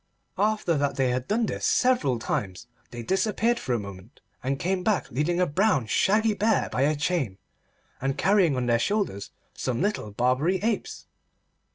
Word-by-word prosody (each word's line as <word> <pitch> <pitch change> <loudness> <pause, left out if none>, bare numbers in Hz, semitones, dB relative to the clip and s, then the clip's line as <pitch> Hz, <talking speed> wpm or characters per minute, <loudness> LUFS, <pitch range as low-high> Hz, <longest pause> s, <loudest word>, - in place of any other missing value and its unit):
After 205 -6 +1
that 140 0 0
they 130 -2 +1
had 125 0 -2
done 225 +2 +1
this - - -4
several 240 - +2
times, 95 -1 -3 0.2
they 120 -1 -7
disappeared 215 - +1
for 125 - -2
a 120 - 0
moment 100 +3 -10 0.2
and 135 +2 -1
came 180 +4 -1
back 215 -1 0
leading 150 +8 0
a 180 - +4
brown 170 - +1
shaggy 215 - +2
bear 210 +2 +1
by 125 - -1
a 150 +3 +3
chain, 145 - -1 0.6
and 135 +1 -1
carrying 190 -7 +3
on 125 -1 -1
their 120 -1 +2
shoulders 200 - -1 0.2
some 125 -2 -3
little 200 - -1
Barbary 125 - +1
apes. 220 -2 -2
150 Hz, 170 wpm, -26 LUFS, 125-205 Hz, 0.6 s, a